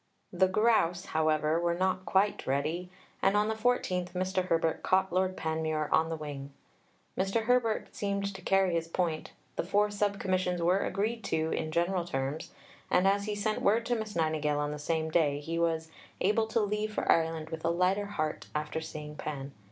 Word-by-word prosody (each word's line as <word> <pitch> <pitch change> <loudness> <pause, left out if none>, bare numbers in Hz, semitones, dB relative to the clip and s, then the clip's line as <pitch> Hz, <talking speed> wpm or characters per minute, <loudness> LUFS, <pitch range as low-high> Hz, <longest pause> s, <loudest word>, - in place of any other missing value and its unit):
The 185 +1 +4
grouse, 185 -3 +2
however, 155 0 +2
were 170 0 +1
not 185 +1 0
quite 200 +2 +2
ready, 155 +7 -1 0.3
and 195 +1 +3
on 210 +1 +2
the - - +1
14th 215 -6 0
Mr. 185 0 0
Herbert 165 -1 +1
caught 190 -1 +2
Lord 185 0 +1
Panmure 160 -1 -1
on 160 0 +3
the 165 - -2
wing. 145 -3 -7 0.6
Mr. 195 +4 0
Herbert 235 -2 +1
seemed 200 0 -1
to 190 - -9
carry 190 -1 +2
his 165 -1 0
point, 165 -2 -2 0.2
the - - +1
four 205 +4 +2
Sub 205 -1 0
Commissions 185 -1 0
were 175 +3 +3
agreed 220 +4 -1
to 160 0 0
in 155 - -2
general 175 +2 +1
terms, 135 -1 -3 0.4
and, 180 +2 +4
as 200 +1 +2
he 210 -1 -2
sent 215 +1 -1
word 225 +3 +3
to 245 - +1
Miss 220 -2 -4
Nightingale 155 -2 +1
on 145 0 -1
the 150 - -5
same 160 +1 -1
day, 150 -4 +2
he 165 +3 -3
was 160 -1 0 0.3
"able 215 +3 +2
to 225 - +1
leave 210 +1 -1
for - - -3
Ireland 160 -1 +2
with 160 0 -5
a 165 - +2
lighter 185 +4 +1
heart 155 -7 -3
after 150 +1 -2
seeing 150 -1 -7
Pan. 140 -2 -5
180 Hz, 190 wpm, -30 LUFS, 160-200 Hz, 0.6 s, The